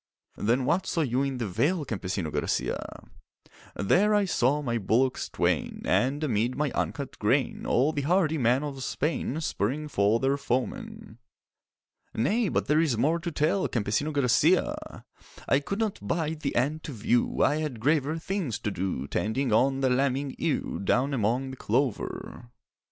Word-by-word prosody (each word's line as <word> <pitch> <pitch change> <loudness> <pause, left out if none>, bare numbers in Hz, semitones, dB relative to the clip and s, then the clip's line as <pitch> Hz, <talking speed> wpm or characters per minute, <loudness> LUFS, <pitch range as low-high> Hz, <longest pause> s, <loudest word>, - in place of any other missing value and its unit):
'Then 120 +4 +1
what 170 +7 +1
saw 165 - 0
you 130 -3 +1
in 135 -2 -1
the 120 -3 -2
vale, 150 - 0
Campesino 95 - -3
Garcia?' - - -2 0.7
'There 205 - +3
I 205 -1 +3
saw 145 -4 +1
my 120 -3 -1
bullocks 125 +6 +1
twain, - - -1
And 140 +5 +1
amid 120 -2 0
my 150 -2 0
uncut 140 -2 -3
grain 125 +5 0
All 140 +6 +2
the 145 - -1
hardy 160 0 +2
men 125 +3 +2
of 135 -3 -5
Spain 150 +1 -2
Spurring 150 +2 -2
for 105 -4 +2
their 135 +2 +1
foemen.' 215 - -4 1.0
'Nay, 200 - +1
but - - 0
there 155 +2 +3
is 145 -8 +1
more 155 +8 +2
to 170 0 -4
tell, 155 +6 +1
Campesino 120 +7 -1
Garcia!' 140 -5 +1 0.4
'I 140 - +4
could 195 +7 -4
not 220 -3 -1
bide 160 -2 -2
the 140 -3 -3
end 145 +6 0
to 145 - -5
view; 120 +2 +1
I 145 - +3
had 150 -7 -3
graver 150 +4 +1
things 165 - -2
to 105 - -2
do 90 -8 -3
Tending 110 - -1
on 135 +4 +3
the 130 -1 +2
lambing 135 +1 0
ewe 160 - -1
Down 130 +7 +1
among 125 +3 0
the 130 - -9
clover. 125 -2 -2
135 Hz, 160 wpm, -27 LUFS, 120-155 Hz, 1.0 s, I